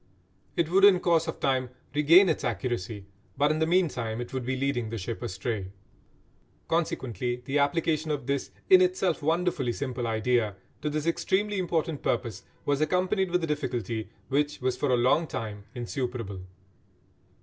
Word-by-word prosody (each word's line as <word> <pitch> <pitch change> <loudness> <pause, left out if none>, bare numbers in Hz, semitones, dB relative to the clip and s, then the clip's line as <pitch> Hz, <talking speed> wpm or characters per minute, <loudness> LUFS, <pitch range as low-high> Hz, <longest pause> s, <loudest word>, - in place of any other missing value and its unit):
It 170 - +2
would 195 +3 +3
in 200 -3 +8
course 165 -2 +2
of 160 - -4
time 130 -2 +1 0.2
regain 165 +6 +6
its 160 - 0
accuracy, 110 -3 -3 0.3
but 145 +1 +3
in 155 - 0
the 160 - +2
meantime 135 -11 +1
it 120 +1 -6
would 130 -1 -2
be 130 +2 -1
leading 130 -4 -1
the 115 - -4
ship 110 +3 -5
astray. 100 -2 -3 1.0
Consequently 125 -7 -1
the 140 +3 +1
application 155 +2 +1
of 145 -5 -2
this, 140 0 -1 0.2
in 375 -1 +8
itself 360 - +1
wonderfully 160 -4 +1
simple, 125 -2 -3
idea, 110 -1 +1 0.3
to 150 - -1
this 150 0 -2
extremely 195 +4 0
important 165 -4 -1
purpose 115 -3 -1 0.2
was 145 0 +1
accompanied 185 +3 +1
with 180 0 +1
a - - 0
difficulty 120 -7 -2 0.2
which 145 +2 0
was 130 0 0
for 145 - -1
a 125 - +4
long 135 +7 +3
time 105 -5 -5
insuperable. 120 -5 -4
140 Hz, 160 wpm, -28 LUFS, 120-165 Hz, 1.0 s, in